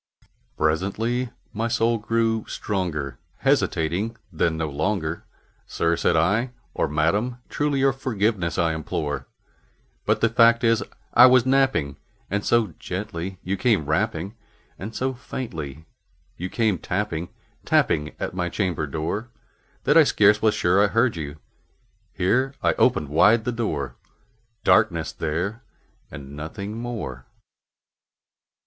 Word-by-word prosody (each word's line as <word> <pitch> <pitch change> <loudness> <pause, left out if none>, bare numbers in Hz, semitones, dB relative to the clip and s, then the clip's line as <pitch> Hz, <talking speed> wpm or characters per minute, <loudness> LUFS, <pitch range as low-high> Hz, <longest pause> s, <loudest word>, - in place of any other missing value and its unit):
Presently 100 +11 0 0.2
my 115 +2 -1
soul 115 0 +1
grew 115 0 0
stronger; 75 - -3 0.2
hesitating 90 +9 0 0.2
then 80 0 +1
no 80 -1 -1
longer, 80 +2 -2 0.4
"Sir," 85 0 +1
said 85 - +1
I, 100 +10 +2 0.2
"or - - 0
Madam, 90 - 0
truly 145 -2 0
your 135 0 +4
forgiveness 105 -8 -1
I 85 -3 +2
implore; 75 -2 -3 0.8
But - - +2
the - - +4
fact 115 +1 +5
is 115 -1 +3 0.3
I - - +9
was 130 -1 +5
napping, 130 - +2 0.3
and 100 +1 0
so 115 -7 +2
gently 95 -1 -5
you 95 +2 -1
came 100 - +2
rapping, 95 +3 -1 0.5
And 105 +4 -7
so 130 +1 -1
faintly 80 - -6 0.5
you 90 +2 -5
came 110 -6 +1
tapping 90 -3 -2 0.3
tapping 75 0 +1
at - - -3
my 90 -1 -1
chamber 90 -6 -1
door, 80 - -3 0.5
That - - +4
I - - +9
scarce 105 0 +4
was 110 -1 +3
sure 95 +3 +3
I - - +4
heard 115 +1 +2
you" 75 -2 -6 0.7
here 130 +9 +1
I - - +3
opened 75 -3 +2
wide 110 +9 +4
the 125 - 0
door: 75 - -3 0.7
Darkness 85 -7 +3
there 85 +8 -3 0.5
and 70 +1 -9
nothing 100 +8 -6
more. 110 - -5
100 Hz, 130 wpm, -24 LUFS, 80-115 Hz, 0.8 s, I